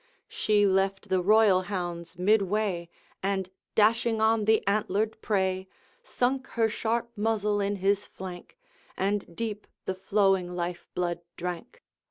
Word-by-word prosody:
She 210 -1 +2
left 195 0 +1
the 185 -1 +2
royal 205 -1 +5
hounds 175 -4 -4
midway, 195 -2 +1 0.3
And 190 -1 -1 0.2
dashing 225 +1 +3
on 220 -1 +3
the 220 0 +3
antlered 215 +2 0
prey, 190 -2 0 0.3
Sunk 265 - -1
her 225 -1 +4
sharp 235 +2 -1
muzzle 210 -1 +1
in 200 +1 0
his 200 +1 +1
flank, 185 - -9 0.4
And 195 -3 -1
deep 215 -1 -4 0.2
the 190 - -1
flowing 190 -2 +1
life 175 0 -4
blood 175 -1 -1 0.2
drank. 180 - -6
200 Hz, 130 wpm, -28 LUFS, 185-220 Hz, 0.4 s, royal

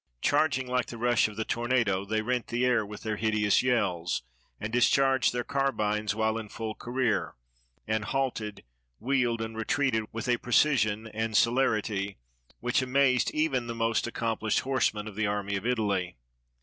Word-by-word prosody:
Charging 145 - +2
like 125 0 -1
the 120 - -7
rush 120 0 +3
of 105 - -9
the 110 +1 -3
tornado, 115 -5 0
they 110 +1 -1
rent 125 +1 -1
the 120 +1 0
air 125 -3 +3
with 105 +1 -9
their 110 -1 -2
hideous 105 -2 +2
yells, 95 - 0 0.4
and 110 +2 -5
discharged 130 +2 +3
their 120 0 -2
carbines 110 -7 0
while 110 0 0
in 110 -2 -8
full 110 0 -5
career, 120 -2 -1 0.5
and 110 -1 0
halted, 120 -6 -2 0.3
wheeled, 120 -2 0
and 110 0 -6
retreated 115 -1 0
with 115 +1 -5
a 120 -1 +3
precision 115 -4 +2
and 110 0 -1
celerity 110 -5 +1 0.4
which 125 +2 +1
amazed 130 -1 +2
even 140 -6 0
the 115 - -4
most 115 -1 +1
accompHshed 110 -2 0
horsemen 115 -5 0
of 105 - -7
the 110 0 0
Army 100 -1 -2
of 95 +4 -3
Italy. 100 -7 0
115 Hz, 160 wpm, -28 LUFS, 105-125 Hz, 0.5 s, rush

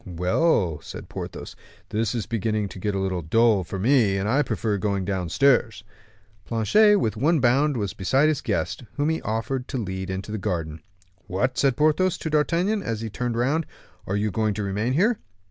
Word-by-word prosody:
"Well," 90 - +1
said - - -9
Porthos, - - -7 0.3
"this 110 +2 -1
is 115 - -2
beginning 110 -2 -1
to 95 - -9
get 105 +2 -2
a - - 0
little 95 -2 -1
dull 110 +4 +3
for 95 - -6
me, 110 -2 +3
and 95 +1 -1
I 135 +7 +3
prefer 110 -5 -1
going 100 -2 -1
downstairs." 110 - +1 0.6
Planchet 205 - +4
with 115 - 0
one 155 +7 +2
bound 135 +3 +3
was 100 -4 -2
beside 135 +10 +2
his 155 -2 0
guest, - - -2
whom 145 +1 0
he 160 - -1
offered 115 +4 -3
to 135 - -4
lead 95 -4 -4
into 95 +2 -4
the 110 - -3
garden. 80 -6 -3 0.5
"What!" 105 +7 -1
said 135 -3 +2
Porthos 155 +5 +2
to 160 - -4
D'Artagnan, 175 +7 +1
as 115 - -3
he 110 -2 -5
turned 120 +1 -2
round, 145 +7 +1 0.4
"are 95 - -1
you 105 +1 0
going 110 0 0
to 105 - -3
remain 105 +5 -1
here?" 210 - +2
110 Hz, 190 wpm, -24 LUFS, 100-140 Hz, 0.6 s, Planchet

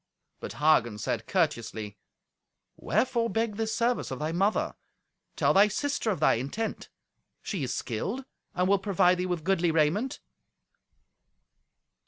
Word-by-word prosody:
But - - -6
Hagen 125 -7 +3
said 110 +2 -3
courteously, 115 - -1 0.8
"Wherefore 235 -2 0
beg 225 -2 -1
this 220 0 -1
service 240 +1 0
of 130 - -4
thy 155 +3 -2
mother? 195 +5 +1 0.6
Tell - - +3
thy 200 +2 +6
sister 275 +2 -1
of 195 - -1
thy 155 - +4
intent. 215 - -4 0.5
She 195 -7 -3
is 125 - -2
skilled, 210 - -3 0.3
and 180 0 +1
will 200 0 +4
provide 185 -2 +3
thee 180 - -1
with 175 -3 -2
goodly 180 -1 +2
raiment." 165 - +1
185 Hz, 135 wpm, -28 LUFS, 150-220 Hz, 0.8 s, thy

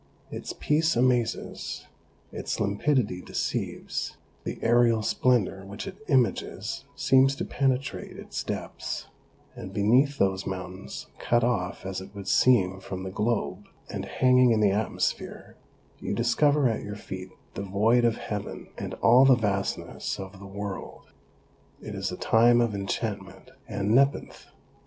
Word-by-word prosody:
Its - - -5
peace 160 +2 +2
amazes, 120 -2 0 0.5
its - - -4
limpidity 105 -1 +1
deceives, - - -3 0.3
the - - -3
aerial 115 -1 +4
splendour 110 -6 +1
which 100 +1 -7
it 195 0 -8
images 130 -6 0
seems 135 +1 +4
to - - -3
penetrate 135 0 -1
its - - -5
depths, - - -4 0.5
and 95 +1 -8
beneath 125 +8 +3
those 95 -2 +1
mountains, 95 0 -6
cut 120 0 +2
off 100 -7 -1
as 95 0 -3
it 100 +2 -12
would 100 -1 -7
seem 95 -8 +4
from 95 -1 -6
the 95 - -5
globe, 105 -2 -1 0.2
and - - -4
hanging 125 -1 +4
in 115 -2 +3
the 105 -2 +4
atmosphere, 105 +2 -2 0.4
you - - -3
discover 145 +4 +3
at 115 - -1
your 105 0 -6
feet 95 -2 -7 0.2
the - - -5
void 105 +5 +2
of 115 -1 +2
heaven 105 -1 -5
and - - -4
all 125 +3 +7
the 135 -1 +7
vastness 100 -4 -2
of 95 0 -8
the 100 - -10
world. 100 0 -7 0.7
It - - -8
is - - -3
a - - -5
time 120 +2 +5
of 115 -2 +2
enchantment 100 -1 -4 0.2
and 100 +2 -1
nepenthe. 135 +3 +1
110 Hz, 140 wpm, -27 LUFS, 100-125 Hz, 0.7 s, all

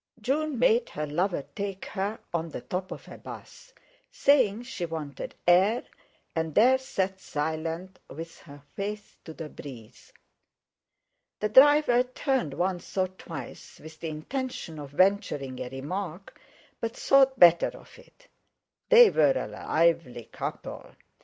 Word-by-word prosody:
June 285 +5 -1
made 235 -1 +3
her 150 - -4
lover 170 +1 -1
take 200 -2 -4
her 205 +2 -3 0.2
on 165 -1 -1
the 135 - -6
top 180 +9 -4
of - - -8
a - - -11
'bus, - - -11 0.4
saying 245 -6 +3
she 245 -7 -6
wanted 155 -5 -5
air, 195 +9 +4 0.5
and 160 -2 -2
there 255 +4 +6
sat 190 -7 -2
silent, 160 +4 -4
with 165 +3 -9
her 145 -3 -14
face 210 +1 -5
to 160 - -9
the 160 0 -7
breeze. 125 -7 -12 1.3
The 210 - 0
driver 265 0 +6
turned 255 - -1
once 180 +1 -3
or 185 -1 +2
twice, 180 -3 -10
with 155 +1 -12
the 165 - -4
intention 165 - -5
of 145 -2 -8
venturing 145 - +1
a 125 - -4
remark, 175 +7 -6 0.4
but 230 0 -4
thought 270 -1 +4
better 175 -1 +7
of - - -16
it. - - -21 0.6
They 480 -2 +8
were 145 -3 +4
a 130 - -1
lively 145 +2 0
couple! - - -6
185 Hz, 140 wpm, -27 LUFS, 155-230 Hz, 1.3 s, They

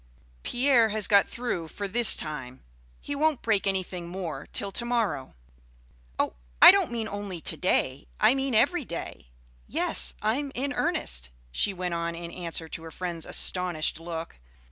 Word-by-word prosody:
Pierre 245 - +3
has 215 -2 +1
got 200 -1 +4
through 235 -9 -4
for 200 +5 -6
this 235 +3 +7
time. 135 -5 -6 0.4
He - - -6
won't 300 -1 0
break 210 -3 +1
anything 185 -2 -3
more 170 -6 -6
till 200 - 0
to 235 - -1
morrow." 230 - -2 0.8
"Oh, - - 0 0.3
I - - +11
don't 390 -3 +1
mean 230 -2 -2
only 205 -4 -6
to - - 0
day; - - -1
I - - +5
mean 270 -2 -1
every 290 +9 +2
day. 170 - -7 0.4
Yes, - - +3
I'm 270 +7 -1
in 280 +3 -2
earnest," - - -1 0.2
she 200 - +2
went 180 -2 -4
on 170 0 -3
in 170 0 -7
answer 170 -2 -4
to 160 - -7
her 165 - -9
friend's 170 -1 -5
astonished 175 -4 +1
look. 165 - -7
190 Hz, 165 wpm, -26 LUFS, 170-235 Hz, 0.8 s, I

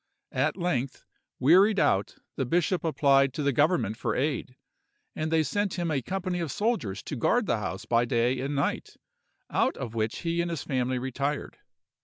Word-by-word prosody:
At - - 0
length, 140 -8 -2 0.3
wearied 190 +9 +5
out, 95 +1 +1 0.2
the 135 - -1
bishop 175 +7 +1
applied 140 -4 +3
to 150 - -2
the 140 -1 +2
government 125 - +2
for - - -2
aid; 130 -2 -2 0.6
and 155 0 -2
they 160 -1 +3
sent 205 +4 -1
him 175 -3 -1
a 140 -3 0
company 185 +2 -3
of 165 -5 -2
soldiers 205 - -1
to - - -5
guard 230 - +2
the 115 - 0
house 95 -2 -5
by 120 0 +2
day 120 +1 +1
and 140 +3 -2
night, 140 - -2 0.6
out - - +1
of 115 -3 -5
which 110 -1 -2
he 170 0 0
and 170 - -2
his 165 -4 -3
family 130 -1 -1
retired. 140 +3 -3
140 Hz, 180 wpm, -27 LUFS, 125-170 Hz, 0.6 s, wearied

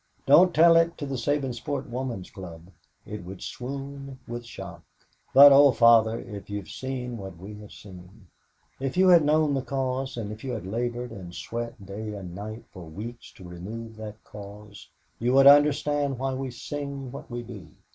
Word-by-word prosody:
Don't 175 +7 +7
tell 165 +1 +6
it 165 0 +2
to 145 - -5
the 135 - -5
Sabinsport 135 +1 -2
Woman's 120 -6 -5
Club. 85 -2 -10 0.3
It 105 -3 -7
would 95 +1 -9
swoon 135 +1 -7
with 120 0 -6
shock 90 -6 -9 0.5
but, 140 +1 +10
oh 140 0 +8
Father, 115 -1 +5
if 105 -2 -9
you'd 100 -2 -5
seen 125 -2 -5
what 95 -4 -9
we 95 +5 -9
have 105 -1 -12
seen 95 +1 -14 0.5
if 135 +4 -3
you 185 0 +5
had 170 -3 +7
known 150 0 +3
the 135 - 0
cause 130 0 -3
and 105 -3 -4
if 110 +1 -9
you 130 -2 -3
had 110 -6 -5
labored 120 +4 -3
and 90 -5 -9
sweat 115 -3 -6
day 105 +2 -6
and 95 -4 -8
night 110 +4 -7
for 90 -2 -10
weeks 110 +9 -9
to 90 - -12
remove 110 +6 -8
that 105 0 -9
cause, 105 0 -12 0.3
you 120 +2 +1
would 135 0 +6
understand 145 -1 +5
why 135 +1 -2
we 130 0 -4
sing 140 +1 -6
what 140 - -9
we 120 -1 -5
do. - - -10
120 Hz, 180 wpm, -26 LUFS, 105-135 Hz, 0.5 s, but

